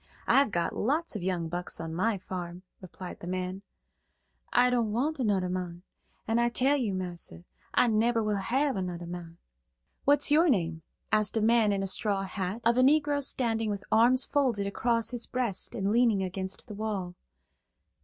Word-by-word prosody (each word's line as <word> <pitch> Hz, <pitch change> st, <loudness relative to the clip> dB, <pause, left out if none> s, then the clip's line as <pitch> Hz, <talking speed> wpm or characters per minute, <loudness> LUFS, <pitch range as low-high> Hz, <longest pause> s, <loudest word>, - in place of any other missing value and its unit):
I've 275 Hz, -2 st, +4 dB
got 175 Hz, -4 st, -1 dB
lots 300 Hz, +5 st, 0 dB
of 210 Hz, -, -3 dB
young 175 Hz, -2 st, -1 dB
bucks 175 Hz, +1 st, -2 dB
on 165 Hz, 0 st, -5 dB
my 205 Hz, +5 st, +1 dB
farm," 180 Hz, -1 st, -7 dB, 0.2 s
replied 185 Hz, 0 st, -9 dB
the 175 Hz, -, -8 dB
man. 185 Hz, +1 st, -3 dB, 0.9 s
"I 250 Hz, +1 st, +4 dB
don't 235 Hz, -3 st, +1 dB
want 280 Hz, +7 st, -1 dB
anudder 200 Hz, -6 st, +1 dB
mon, 180 Hz, -1 st, -4 dB, 0.4 s
an' 225 Hz, +1 st, +2 dB
I 235 Hz, 0 st, +3 dB
tell 265 Hz, +4 st, +2 dB
you, 230 Hz, -9 st, -1 dB
massa, 175 Hz, -, -6 dB, 0.3 s
I -, -, +5 dB
nebber 230 Hz, 0 st, +2 dB
will 210 Hz, -1 st, 0 dB
hab 265 Hz, +8 st, 0 dB
anudder 175 Hz, -2 st, -4 dB
mon." 170 Hz, -1 st, -8 dB, 0.7 s
"What's 290 Hz, +1 st, +4 dB
your 320 Hz, +3 st, +5 dB
name?" 170 Hz, -, 0 dB, 0.3 s
asked 215 Hz, 0 st, +2 dB
a -, -, +3 dB
man 225 Hz, -1 st, +4 dB
in 195 Hz, -1 st, 0 dB
a -, -, -2 dB
straw 200 Hz, 0 st, 0 dB
hat, 195 Hz, +3 st, -4 dB
of 235 Hz, +1 st, +3 dB
a -, -, +5 dB
Negro 290 Hz, +1 st, +3 dB
standing 225 Hz, -4 st, 0 dB
with 200 Hz, -1 st, -3 dB
arms 245 Hz, +4 st, +4 dB
folded 250 Hz, -9 st, +1 dB
across 230 Hz, +3 st, 0 dB
his 240 Hz, -2 st, -5 dB
breast 240 Hz, -7 st, -1 dB
and 200 Hz, -2 st, -1 dB
leaning 225 Hz, -4 st, +3 dB
against 190 Hz, +1 st, -5 dB
the 210 Hz, -, -7 dB
wall. 200 Hz, -4 st, -3 dB
210 Hz, 175 wpm, -29 LUFS, 185-240 Hz, 0.9 s, I